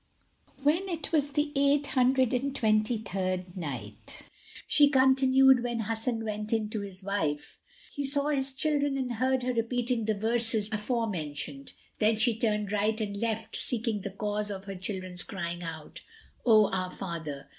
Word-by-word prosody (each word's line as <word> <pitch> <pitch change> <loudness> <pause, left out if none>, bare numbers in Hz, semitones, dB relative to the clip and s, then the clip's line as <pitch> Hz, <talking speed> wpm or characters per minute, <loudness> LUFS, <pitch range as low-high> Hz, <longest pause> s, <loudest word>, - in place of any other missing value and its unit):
When 335 +7 +2
it 335 -3 -3
was 290 -3 +1
the 295 0 0
Eight 280 +1 +3
Hundred 260 -1 +2
and 270 +2 -1
Twenty 215 -1 +2
third 185 -3 -3
Night, 125 - -7 0.4
She 290 -1 +6
continued, 265 -1 +5
When 240 -2 -2
Hasan 225 +1 -1
went 210 0 -4
in 220 -2 0
to 215 - -2
his 195 -1 -9
wife 160 -7 -2 0.3
he 285 - -3
saw 280 +1 +2
his 270 -2 +1
children 290 -1 +1
and 250 -3 -3
heard 260 +1 +1
her 250 0 0
repeating 235 0 -1
the 215 0 +1
verses 225 0 0
afore 225 +2 -1
mentioned.[FN#168] 145 -6 -6
Then 220 +1 +3
she 225 +1 +3
turned 210 -2 0
right 210 +2 +1
and 205 -2 -3
left, 220 +1 -2
seeking 230 -3 -1
the 200 - -4
cause 210 +1 -3
of 195 -1 -6
her 195 - -5
children's 185 -1 -4
crying 175 -4 -5
out, 160 -2 -7 0.5
"O 215 -3 +6
our 185 -1 -1
father!" 160 -7 -6
220 Hz, 165 wpm, -29 LUFS, 195-260 Hz, 0.5 s, She